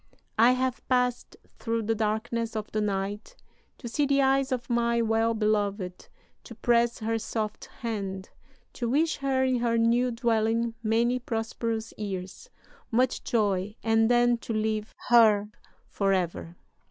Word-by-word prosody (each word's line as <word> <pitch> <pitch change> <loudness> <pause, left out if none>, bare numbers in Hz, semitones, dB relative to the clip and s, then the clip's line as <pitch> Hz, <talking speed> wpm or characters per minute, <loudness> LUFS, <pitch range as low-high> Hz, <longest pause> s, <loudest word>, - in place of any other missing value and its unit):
"'I 240 +3 +7
have 255 0 -2
passed 250 -1 0 0.2
through 230 -1 -1
the 225 +2 +1
darkness 225 +1 -2
of 215 -1 -4
the 215 - -1
night 205 - -3 0.4
to 245 - -8
see 285 +5 0
the 280 0 +2
eyes 270 0 +2
of 250 -2 -2
my 235 -1 +1
well 225 0 +1
beloved, 205 -4 -1 0.3
to 235 - -11
press 235 +1 +2
her 225 0 -1
soft 215 -1 -4
hand, 195 -5 -5 0.4
to 240 -2 -3
wish 310 +6 +1
her 270 -1 0
in 260 -1 +2
her 235 -1 +1
new 235 +2 +3
dwelling 230 -1 0
many 235 +3 +1
prosperous 225 -1 -3
years, 190 -3 -6 0.4
much 250 +2 +1
joy, 205 -3 0
and 225 0 +3
then 240 -1 +3
to 230 - -5
leave 215 0 -2
her 215 -3 +5 0.4
forever.'... 185 -4 -1
230 Hz, 140 wpm, -27 LUFS, 215-240 Hz, 0.4 s, I